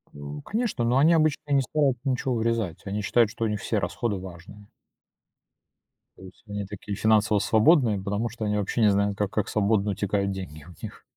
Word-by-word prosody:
О, 75 0 -7
конечно, 225 - -2
но 120 +2 +2
они 155 +5 +5
обычно 155 -2 +1
не 140 -1 +4
стараются 135 -1 0
ничего 130 0 -1
урезать. 115 -7 -1
Они 100 +1 -3
считают, 115 +2 +3
что 115 +1 -3
у - - +1
них 105 -1 -2
все 110 - -1
расходы 100 +3 -2
важные. 95 +3 -11 1.5
То - - -15
есть 95 -1 -14
они 105 0 -4
такие 100 +1 -6
финансово 110 -1 +3
свободные, 110 - +3
потому 105 +4 -2
что 110 0 -6
они 105 0 0
вообще 105 +3 -1
не 105 -2 +5
знают, 100 0 0
как 105 -2 -1
как 105 -2 -1
свободно 105 -1 +1
утекают 100 0 -1
деньги 90 -6 -7
у 90 +4 -14
них. - - -8
105 Hz, 195 wpm, -26 LUFS, 100-120 Hz, 1.5 s, они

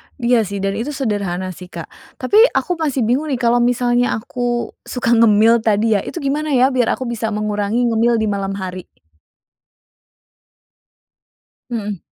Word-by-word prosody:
Iya 240 -2 +2
sih, 200 +2 -5
dan 195 0 0
itu 240 +6 -3
sederhana 200 -7 -2
sih, 180 +1 -11
Kak. - - -7 0.3
Tapi 420 - +2 0.2
aku 360 - 0
masih 280 -6 0
bingung 260 +7 0
nih, 275 - 0
kalau 240 0 +2
misalnya 245 0 +1
aku 240 +1 -3 0.2
suka 245 -2 -1
ngemil 225 0 +5
tadi 220 0 +2
ya? 205 - +2
Itu - - -8
gimana 295 +3 -1
ya, 260 +2 +4
biar 245 -3 +1
aku - - -6
bisa 235 -2 -3
mengurangi 210 +2 -1
ngemil 235 0 +2
di 220 - 0
malam 195 -1 -3
hari? 185 -2 -6 2.8
Mhm. 210 -5 -4
230 Hz, 155 wpm, -18 LUFS, 205-245 Hz, 2.8 s, ngemil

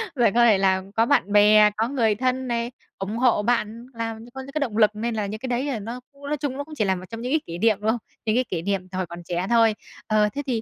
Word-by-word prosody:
Rồi 235 -5 +3
có 240 0 +6
thể 215 -4 +5
là 190 -1 +2
có 225 +1 +4
bạn 235 -7 +2
bè, 210 0 +6
có 225 +1 +1
người 230 -6 +1
thân 255 +2 -1
này, 235 0 -2 0.3
ủng 200 +4 -4
hộ 245 -4 +3
bạn 230 0 -1
làm 225 0 -5
có 265 - -6
những 275 +1 -10
cái 305 - -1
động 230 -7 -2
lực 215 -1 +5
nên 230 +1 -2
là 210 -2 -1
những 215 +2 -5
cái 260 - -5
đấy, 250 +3 -1
à, 235 -5 -2
nó 230 +4 -6
cũng 280 0 -11
nói 300 +1 -1
chung 275 -1 -3
nó 285 - -3
cũng 310 +1 -12
chỉ 215 - +1
là 190 -1 +1
một 185 +1 -8
trong 230 0 -7
những 250 +2 -3
cái 315 - +3
kỹ 170 +1 -5
niệm, 215 +1 +3
đúng 215 - 0
không? 240 - -2 0.3
Những 215 +1 +1
cái 255 0 +2
kỉ 170 -3 -2
niệm 195 0 -2
từ 185 - -5
hồi 185 - -1
còn 170 +1 -9
trẻ 175 +1 -2
thôi. 225 -2 +4 0.3
Ờ, 210 -1 +3
thế 285 - -3
thì, 230 -3 0
225 Hz, 305 wpm, -24 LUFS, 205-250 Hz, 0.3 s, có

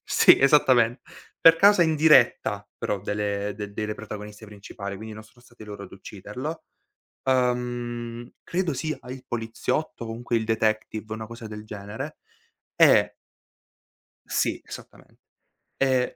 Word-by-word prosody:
sì, - - +6
esattamente, 130 -4 +4 0.4
per 165 0 +8
causa 200 0 +6
indiretta 145 -10 +4
però 100 - -2
delle 105 0 -2
de 105 -1 -5
de 100 - -16
delle 105 0 -3
protagoniste 105 0 -9
principali, 100 -1 -8
quindi 110 +1 -8
non 110 - -10
sono 115 +3 -22
stati 120 -3 -14
loro 100 -1 -8
ad 95 - -14
ucciderlo. 125 - -7 0.6
Uhm, 120 -2 -1
credo 175 -2 -1
sia 155 +3 -3
a 125 - -11
il 130 -1 -10
poliziotto, 115 +3 -3
comunque 115 +1 -2
il 110 - 0
detective, 110 -1 -1
una 110 0 -5
cosa 115 0 -9
del 105 0 -8
genere, 110 +8 -7 0.6
e - - +5 1.1
Sì, - - -1
esattamen - - -11 0.7
ehm, 130 -2 +1
115 Hz, 135 wpm, -25 LUFS, 105-130 Hz, 1.1 s, per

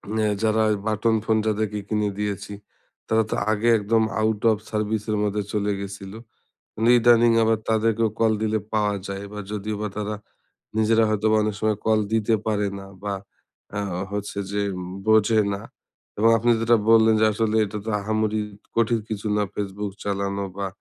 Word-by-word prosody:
হ্যাঁ 110 -1 +1
যারা 110 0 +2
ওই - - +2
বাটন 110 +1 +1
ফোন 110 -1 +2
যাদেরকে 105 -1 -1
কিনে 105 -1 0
দিয়েছি 105 0 -3 0.5
তারা 110 0 +3
তো - - -1 0.2
আগে 110 +2 0
একদম 110 +2 +2 0.2
আউট 110 -1 0
অফ 110 - +1
সার্ভিসের 110 0 -1
মধ্যে 105 0 0
চলে 105 -1 0
গেছিলো। 100 +1 -7 0.8
ইদানিং 120 0 +5
আবার 110 -1 +2
তাদেরকেও 110 0 +2
কল 115 -1 +4
দিলে 110 0 +1
পাওয়া 105 -1 +1
যায় 100 0 -5
এবার 105 0 -7
যদিও 105 0 -3
বা 105 - -1
তারা 105 0 -2 0.6
নিজেরা 110 +1 +4
হয়তোবা 110 +1 +2
অনেক 105 -1 -1
সময় 110 -1 +1
কল 110 -1 +3
দিতে 110 0 +2
পারে 105 -1 +1
না। 95 - -10 0.2
বা 100 -1 -2 0.6
আ - - 0 0.3
হচ্ছে 105 0 -4
যে 100 0 0 0.5
বোঝে 110 0 +4
না 100 - -5 0.6
এবং 110 +2 +4
আপনি 120 +2 +2
যেটা 115 +1 +4
বললেন 110 0 +6
যে - - +6
আসলে 110 0 0
এটা 105 +1 -6
তো - - -3
আহামরি 110 +1 0 0.4
কঠিন 115 0 +2
কিছু 110 0 -4
না 105 - +2
ফেসবুক 100 0 -4
চালানো 100 0 -2
বা 100 -1 -2
110 Hz, 165 wpm, -24 LUFS, 105-110 Hz, 0.8 s, বললেন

